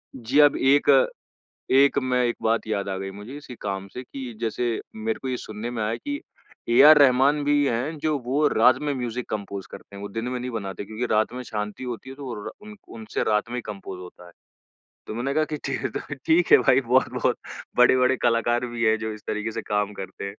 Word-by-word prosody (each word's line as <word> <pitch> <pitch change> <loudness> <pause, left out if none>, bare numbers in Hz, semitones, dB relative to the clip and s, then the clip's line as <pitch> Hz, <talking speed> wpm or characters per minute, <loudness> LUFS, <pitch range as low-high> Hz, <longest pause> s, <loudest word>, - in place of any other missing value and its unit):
जी, 130 +4 0
अब 145 -1 +6
एक 140 +2 +3 0.9
एक 140 +1 +5
मैं 125 -1 +1
एक 120 - 0
बात 115 0 +1
याद 100 -2 -2
आ 95 - -2
गई 95 0 -5
मुझे, 105 +8 -9
इसी 145 -4 -10
काम 95 -1 -4
से 125 - -8
कि 130 -1 -8
जैसे 115 0 -1 0.2
मेरे 110 0 -2
को 130 - -5
ये 125 - -1
सुनने 110 0 -6
में 115 -3 -3
आया 110 +2 -1
कि 285 0 -5 0.5
ए 120 - +4
आर 155 -1 +9
रहमान 140 +2 +4
भी 145 0 +3
है 130 +5 -1
जो 155 0 0
वो 135 +5 0
रात 125 +3 +5
में 145 -1 0
म्यूज़िक 125 -1 -4
कंपोज़ 100 -2 -5
करते - - -12
हैं, 100 - -9
वो 100 - -5
दिन 115 +4 -4
में 125 0 -3
नहीं 125 - -4
बनाते 100 -4 -5
क्योंकि 110 +4 -4
रात 110 +2 +2
में 125 0 -5
शांति 105 +1 -5
होती 125 +2 -6
है 135 - -9
तो 140 - -9
वो 125 -3 -5
रा - - -5 0.2
उन 215 0 -10 0.2
उनसे 110 -1 -4
रात 105 +1 +1
में 125 - -3
ही - - -2
कंपोज़ 95 -3 -7
होता 90 0 -12
है। 85 - -15 0.7
तो - - -6
मैंने 130 +4 -2
कहा 155 - +3
कि - - 0
ठीक 135 - -2
है - - -1
तो, 145 - -6
ठीक 160 +5 +1
है - - +10
भाई 130 - +4
बहुत-बहुत 130 +1 +1 0.4
बड़े-बड़े 125 +1 +5
कलाकार 120 +1 +2
भी 120 -1 -3
है 110 0 +4
जो 110 0 -4
इस 105 - -10
तरीके 110 +1 -3
से - - -4
काम 105 0 -1
करते 95 0 -8
हैं। - - -3
120 Hz, 235 wpm, -24 LUFS, 110-130 Hz, 0.9 s, है